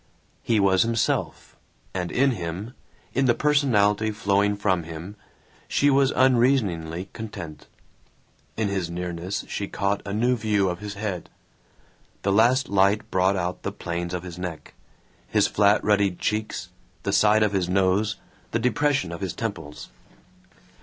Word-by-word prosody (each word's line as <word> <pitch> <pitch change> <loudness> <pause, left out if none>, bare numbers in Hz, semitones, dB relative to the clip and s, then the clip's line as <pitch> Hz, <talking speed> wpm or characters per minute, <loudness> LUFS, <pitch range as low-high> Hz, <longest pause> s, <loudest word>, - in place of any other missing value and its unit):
He 115 -2 +1
was 95 -2 +4
himself, 115 +1 -1 0.4
and 90 -2 -3
in 135 +1 +3
him, 95 +2 -5 0.4
in 135 - +2
the 120 -2 +4
personality 110 -8 +2
flowing 105 -1 +1
from 95 -4 +1
him, 85 +4 -8 0.5
she 145 0 +3
was 135 -1 +4
unreasoningly 105 -10 +2
content. 95 -9 -8 0.9
In 110 -1 +1
his 95 -4 -2
nearness 90 +2 -4
she 100 - -3
caught 100 +1 -1
a 100 - -6
new 120 +5 +2
view 105 -4 +1
of 90 0 -4
his 105 -1 -6
head; 100 -4 -4 0.9
the 100 - +1
last 120 +6 +4
light 100 +2 +2
brought 95 +1 +2
out 90 -1 -3
the - - -3
planes 85 +1 -4
of 90 - -5
his 90 -1 -8
neck, 90 -3 -6 0.5
his - - +3
flat 100 0 +3
ruddied 100 -3 +2
cheeks, 110 0 -2 0.3
the - - -1
side 105 0 +5
of 105 -1 +1
his 90 -2 0
nose, 95 +3 +2 0.3
the - - 0
depression 125 - +1
of 85 - -7
his 95 -2 -2
temples. 80 -10 -6
100 Hz, 145 wpm, -25 LUFS, 90-110 Hz, 0.9 s, side